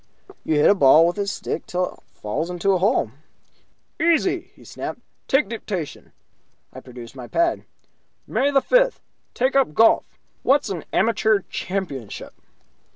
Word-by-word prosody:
"You 155 - 0
hit 150 - +4
a - - +7
ball 155 -2 +6
with 175 +4 -1
a 200 - -1
stick 200 - -4
till 180 0 -2
it - - -21 0.2
falls 105 +11 -3
into 180 +2 0
a 185 - +2
hole." 195 - +1 0.9
"Easy!" 330 0 +2
he - - -18
snapped. - - -6 0.3
"Take 270 +3 +3
dictation." 195 -8 -6 0.6
I - - -8
produced 120 -1 -11
my 125 -2 -8
pad. 340 0 0 0.6
"May 280 - +1
the 275 -1 +3
fifth, - - +3 0.4
take 260 +2 +1
up 265 - +2
golf. 225 - +5 0.4
What's 270 -5 +2
an 175 -5 -5
Amateur 220 -2 +2
Championship?" 175 - -5
195 Hz, 150 wpm, -22 LUFS, 155-265 Hz, 0.9 s, a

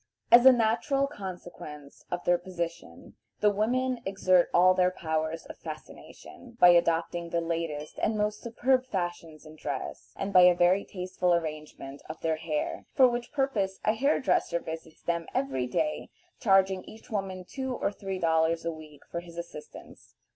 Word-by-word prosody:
As 240 +2 +9
a - - +11
natural 245 +4 +2
consequence 175 - -9
of 175 0 -3
their 175 0 +3
position, 170 - -7 0.2
the 210 - +5
women 245 +4 0
exert 185 -2 +3
all 185 +1 +6
their 180 0 +3
powers 160 -2 -3
of - - -11
fascination, 240 -2 -11
by 180 - +8
adopting 170 0 +2
the 170 - 0
latest 165 -3 -4
and 215 0 0
most 210 0 -1
superb 255 +2 +1
fashions 175 -6 -4
in 155 0 -13
dress, 140 -3 -5
and 195 0 -3
by 185 - +8
a 180 0 +7
very 180 +3 +3
tasteful 180 -1 0
arrangement 155 -4 -5
of 155 - -7
their 160 -1 0
hair, 155 -2 -3
for 265 -3 +7
which 240 0 -3
purpose 220 -9 -1
a 215 - +4
hair 275 +7 +2
dresser 170 -9 +1
visits 160 -1 -8
them 170 -1 -2
every 135 -2 -1
day, 305 - -2 0.3
charging 195 -3 +3
each 220 +1 -14
woman 190 -3 -3
two 265 -2 -4
or - - -1
three 195 -2 -5
dollars 165 -1 +1
a 170 - 0
week 155 -2 -12
for 170 - -5
his 170 -1 -12
assistance. 170 -3 -10
180 Hz, 165 wpm, -28 LUFS, 165-210 Hz, 0.3 s, a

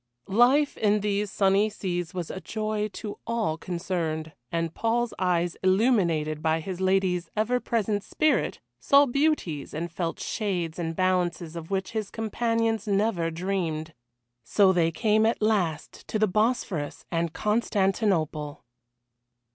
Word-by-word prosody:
Life 255 +8 +4
in 210 -1 +2
these 205 0 0
sunny 195 +2 +3
seas 175 -5 -3
was 175 -3 -4
a 190 - -6
joy 215 0 -2
to 210 -2 -6
all 225 -9 0
concerned, 165 -2 -3 0.2
and 165 -1 -1
Paul's 230 +1 0
eyes 175 -2 +1
illuminated 185 -7 +2
by 160 0 +1
his 185 +2 -5
lady's 185 -2 +1
ever 220 +4 +1
present 215 -4 -1
spirit 305 -6 +1 0.2
saw 280 - +5
beauties 275 - 0
and 170 +2 -3
felt 170 -1 -3
shades 180 -6 -2
and 165 -1 -2
balances 180 -2 0
of 165 -1 -7
which 190 -1 -2
his 215 -3 -3
companions 225 0 -1
never 200 -4 +1
dreamed. 165 -2 -2 0.5
So 190 - +4
they 170 -2 +3
came 215 +5 +2
at 230 - 0
last 190 -8 -1
to - - -1
the 215 - +4
Bosphorus 205 - -1
and 165 -1 0
Constantinople. 195 -8 0
190 Hz, 135 wpm, -26 LUFS, 170-215 Hz, 0.5 s, saw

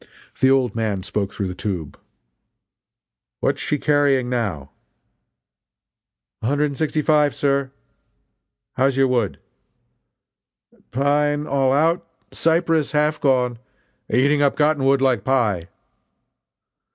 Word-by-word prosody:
The 130 -2 +4
"old 130 -5 +2
man" 110 -4 -2
spoke 100 0 -3
through 100 - -4
the - - -5
tube: 90 -6 -5 1.4
"What - - +1
is - - -8
she 150 - -1
carrying 140 -4 +1
now?" 95 - -3 1.7
"A 110 - -2
hundred 145 +3 +1
and 140 -1 -4
sixty 155 -1 0
five, 150 -2 +2
sir!" 140 -1 0 1.1
"How's 135 0 +2
your 135 0 +4
wood?" 120 -6 0 1.5
"Pine 145 +3 +1
all 135 -2 +1
out 165 +5 +2 0.3
cypress 165 -2 +1
half 150 0 +1
gone 125 -4 +1 0.5
eating 140 +5 +3
up 140 -1 +2
cotton 150 -2 +1
wood 135 0 +3
like 125 -7 +2
pie!" 105 -9 0
135 Hz, 115 wpm, -21 LUFS, 120-150 Hz, 1.7 s, The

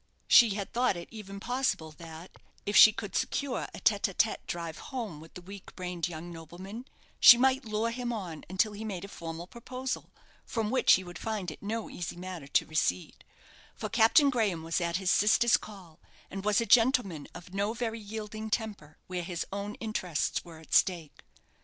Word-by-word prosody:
She 230 -5 +7
had 200 -2 -5
thought 245 -6 +2
it 170 - -8
even 200 -3 -8
possible 245 -9 -1
that, 165 +2 -11 0.3
if 205 - -2
she 215 - +10
could 205 -2 -7
secure 280 -3 -1
a - - -9
tête 205 -2 +2
à - - -16
tête 225 - +1
drive 170 -2 -5
home 230 - -5
with 160 - -15
the 180 - -9
weak 195 +1 -11
brained 180 -2 -3
young 170 0 -7
nobleman, 180 +8 -9 0.3
she 235 - +10
might 265 +1 +2
lure 220 +1 -1
him 245 0 -3
on 180 -9 -5
until 190 +4 +1
he 210 +1 -7
made 195 -4 -5
a - - -9
formal 165 -3 -7
proposal, 255 +5 -5 0.3
from 225 -2 -2
which 260 - +5
he 190 - +3
would 175 -1 -9
find 210 -6 -3
it - - -12
no 220 +2 -3
easy 175 - -6
matter 180 -4 -7
to 140 - +2
recede; 150 - -1 0.5
for - - -5
Captain 260 +6 +5
Graham 205 -10 0
was 165 +2 -1
at 170 0 0
his 190 -1 +1
sister's 220 +3 +4
call, 185 -7 -8 0.3
and 195 0 -5
was 210 0 +3
a 230 - 0
gentleman 225 - +3
of 175 +1 -11
no 200 +2 0
very 230 -1 -3
yielding 215 +1 -6
temper 205 -9 -4
where 180 -1 -4
his 175 0 -4
own 200 +1 -4
interests 185 -8 -2
were 165 -2 -12
at 160 - -11
stake. 170 -6 +2
200 Hz, 190 wpm, -30 LUFS, 175-225 Hz, 0.5 s, she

